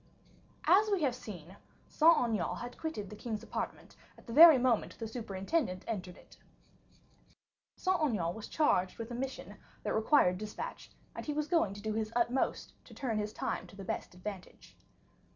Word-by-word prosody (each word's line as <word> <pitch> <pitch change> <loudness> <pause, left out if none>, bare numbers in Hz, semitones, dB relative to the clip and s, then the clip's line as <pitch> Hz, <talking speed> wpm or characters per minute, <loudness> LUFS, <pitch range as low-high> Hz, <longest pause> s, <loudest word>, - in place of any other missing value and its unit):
As 420 +3 +5
we 390 -6 +1
have 265 -4 +2
seen, 195 -6 -10 0.3
Saint 330 +2 +5
Aignan 220 -7 0
had 245 +1 -7
quitted 315 -11 -4
the - - -7
king's 215 0 -5
apartment - - -5 0.2
at - - -18
the 230 - -7
very 320 +1 +10
moment 245 -3 +1
the 225 - -5
superintendent 200 - -2
entered 185 -5 -4
it. - - -18 1.4
Saint 375 0 +1
Aignan 205 - 0
was 220 +1 -8
charged 190 - +1
with 230 +1 -6
a - - -4
mission 260 +2 -5 0.3
that - - -1
required 220 -5 +3
dispatch, 215 0 -7 0.2
and - - -7
he 300 - -1
was 300 0 -1
going 320 - +1
to 205 - -9
do 215 0 -1
his 220 0 -2
utmost 245 +2 0
to - - -14
turn 230 -6 -2
his 210 0 -2
time - - -3
to - - -15
the 195 - -8
best 180 - -4
advantage. 190 0 -9
225 Hz, 175 wpm, -32 LUFS, 200-280 Hz, 1.4 s, very